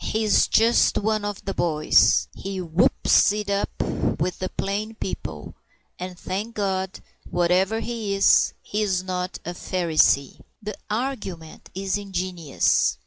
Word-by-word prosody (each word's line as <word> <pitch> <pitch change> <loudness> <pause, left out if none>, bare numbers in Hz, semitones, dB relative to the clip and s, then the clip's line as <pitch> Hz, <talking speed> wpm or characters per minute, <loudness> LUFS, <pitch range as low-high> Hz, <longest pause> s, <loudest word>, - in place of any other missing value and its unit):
He 220 +1 -1
is 215 - +4
just 230 +2 +4
one 215 0 0
of 205 -1 -5
the 195 - -2
boys. 150 - +3
He 195 -1 -5
whoops 175 +3 +3
it 210 -1 -3
up 200 0 0 0.5
with 175 +2 -2
the 185 - -3
plain 210 +3 -3
people, - - -6 0.5
and, 180 0 -6
thank 205 +5 -4
God, 190 -2 -2 0.3
whatever 180 +5 +1
he 225 -4 -3
is, 195 - +4
he 210 - -2
is 190 -3 0
not 185 0 -3
a 175 - -3
Pharisee. 165 -6 +1 0.2
The 210 0 -5 0.2
argument 210 -9 -4
is 195 +1 -1
ingenious. 185 -6 0
190 Hz, 140 wpm, -24 LUFS, 180-210 Hz, 0.5 s, is